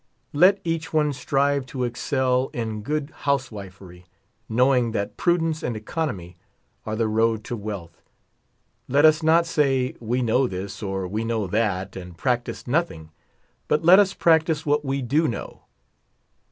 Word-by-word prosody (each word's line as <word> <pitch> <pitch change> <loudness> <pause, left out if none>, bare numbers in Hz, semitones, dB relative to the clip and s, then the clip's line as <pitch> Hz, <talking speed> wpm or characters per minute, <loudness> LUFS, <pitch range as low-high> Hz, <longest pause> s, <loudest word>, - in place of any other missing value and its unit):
Let 185 +7 +5
each 165 +3 -3
one 150 -2 +1
strive 140 +1 0
to 130 -1 -4
excel 130 +1 0
in 110 -2 -4
good 150 +5 -3
housewifery^ 100 -10 -4 0.4
know 125 +4 +3
ing 120 -3 +1
that 100 -2 -3
prudence 165 -2 +1
and 120 -3 -3
economy 105 - -4 0.5
are 110 - -2
the 115 0 0
road 110 0 +1
to 120 - -4
wealth. 100 -6 -7 0.9
Let 140 +4 +4
us 155 +1 +5
not 165 +2 +4
say, 135 -5 +1
we 120 +2 -1
know 125 +3 +2
this, 95 -1 -6
or, 95 -2 -3
we 105 +5 -3
know 115 -2 -1
that, 100 -1 -1
and 90 -2 -9
prac 120 +2 0
tice - - -7
nothing; 120 - -2 0.6
but 150 - +1
let 185 +3 +8
us 195 -1 +2
practice 160 -1 +2
what 150 0 +1
we 135 -1 -2
do 150 +6 +2
know. 120 - -6
125 Hz, 155 wpm, -24 LUFS, 110-150 Hz, 0.9 s, let